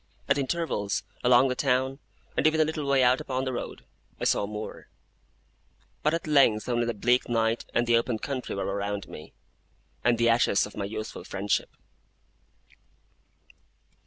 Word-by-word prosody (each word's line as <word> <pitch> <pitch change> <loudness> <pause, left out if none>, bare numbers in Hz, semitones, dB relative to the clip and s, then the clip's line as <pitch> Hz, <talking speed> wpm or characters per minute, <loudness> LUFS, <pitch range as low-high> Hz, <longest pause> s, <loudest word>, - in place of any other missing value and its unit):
At 140 - +3
intervals, 135 -8 -1 0.2
along 125 +1 +6
the 125 - -1
town, 130 0 0 0.4
and - - +3
even 155 0 +2
a 155 - +5
little 155 -2 -3
way 135 -1 +4
out 125 +1 +4
upon 130 0 -2
the 130 - -2
road, 120 - -6 0.3
I - - -5
saw 100 - +2
more: 105 +1 -7 1.1
but 150 - +2
at 165 - -4
length 135 -8 +4
only 120 -1 0
the 120 - -2
bleak 125 +5 +2
night 115 0 +1
and 120 - +3
the 120 0 +4
open 115 0 0
country 130 +2 -4
were 100 - -2
around 100 0 -3
me, 75 - -11 0.7
and 120 -1 +3
the 115 0 +2
ashes 115 -3 +3
of 105 - -11
my 100 - -3
youthful 110 +1 -6
friendship. 100 +1 -1
120 Hz, 160 wpm, -27 LUFS, 110-135 Hz, 1.1 s, along